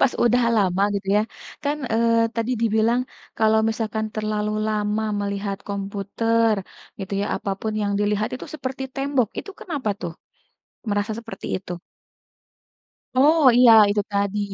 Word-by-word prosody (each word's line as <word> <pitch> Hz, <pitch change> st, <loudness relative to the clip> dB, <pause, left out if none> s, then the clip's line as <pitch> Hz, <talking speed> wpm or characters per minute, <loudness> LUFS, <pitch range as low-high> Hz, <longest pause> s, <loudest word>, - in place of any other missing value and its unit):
pas 270 Hz, -, +4 dB
udah 245 Hz, +1 st, +4 dB
lama 195 Hz, -1 st, +2 dB
gitu 195 Hz, -1 st, -4 dB
ya, 210 Hz, -, +4 dB, 0.4 s
kan, 290 Hz, +1 st, 0 dB, 0.2 s
eee, 230 Hz, 0 st, +3 dB
tadi 230 Hz, +2 st, -1 dB
dibilang, 225 Hz, +2 st, +2 dB, 0.4 s
kalau 220 Hz, 0 st, +4 dB
misalkan 220 Hz, -1 st, -2 dB
terlalu 215 Hz, -1 st, -1 dB, 0.2 s
lama 210 Hz, 0 st, 0 dB, 0.2 s
melihat 200 Hz, 0 st, -3 dB
komputer 205 Hz, +3 st, 0 dB, 0.4 s
gitu 195 Hz, 0 st, -7 dB
ya, 205 Hz, -, -1 dB
apa 200 Hz, -, -4 dB
pun 220 Hz, -, -2 dB
yang 200 Hz, 0 st, 0 dB
dilihat 210 Hz, +1 st, +1 dB
itu -, -, -7 dB
seperti 265 Hz, -2 st, -5 dB
tembok, 270 Hz, -5 st, +1 dB
itu -, -, -6 dB
kenapa 285 Hz, -, -3 dB
tuh 170 Hz, -2 st, -4 dB, 0.8 s
merasa 205 Hz, +1 st, 0 dB
seperti 225 Hz, -4 st, -8 dB
itu? 180 Hz, -2 st, -7 dB, 1.4 s
Oh 305 Hz, +5 st, +5 dB, 0.2 s
iya, 245 Hz, -2 st, +8 dB, 0.2 s
itu 205 Hz, 0 st, +1 dB
tadi, 200 Hz, 0 st, 0 dB
215 Hz, 140 wpm, -23 LUFS, 200-230 Hz, 1.4 s, iya